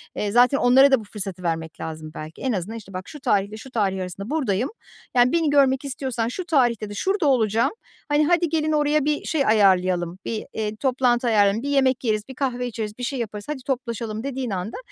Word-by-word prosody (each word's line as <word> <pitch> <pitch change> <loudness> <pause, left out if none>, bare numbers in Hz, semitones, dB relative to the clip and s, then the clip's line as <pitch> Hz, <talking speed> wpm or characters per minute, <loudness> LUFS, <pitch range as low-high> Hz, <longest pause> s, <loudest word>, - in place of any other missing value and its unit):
eee, 205 - -2
zaten 245 +5 +5
onlara 265 +3 +6
da 265 - +5
bu - - -9
fırsatı 195 -3 -6
vermek 160 -1 -3
lazım 155 -1 -6
belki. 155 +1 -8
En 260 - 0
azından, 210 +2 -3
işte, 195 -3 -12
"Bak 185 0 -6
şu 300 - -9
tarihle 210 -5 0
şu 255 +4 -11
tarih 195 -5 0
arasında 185 +3 -6
buradayım, 250 -7 0 0.5
yani, 245 0 +5
beni 330 -2 +2
görmek 275 -1 +3
istiyorsan 260 -4 -2
şu 350 +10 -4
tarihte 240 - +1
de - - -7
şurada 380 - 0
olacağım, 230 -4 +2 0.4
hani, 295 +1 +3
hadi 345 -1 +2
gelin 310 -1 0
oraya 300 -1 +2
bir 300 0 0
şey 300 -4 0
ayarlayalım, 185 -4 +3
bir, 220 -2 -3
eee, 215 -1 -3
toplantı 250 0 +1
ayarlayalım, 210 0 +3
bir 285 - -2
yemek 265 -3 +2
yeriz, 215 -3 0
bir 265 - -9
kahve 250 -2 -2
içeriz, 220 -3 -5
bir 250 - -7
şey 260 +2 -2
yaparız, 210 -3 -5
hadi 280 -4 -4
toplaşalım." 240 -4 -3 0.2
dediğin 265 -2 -3
anda 190 +2 -4
240 Hz, 210 wpm, -23 LUFS, 205-270 Hz, 0.5 s, onlara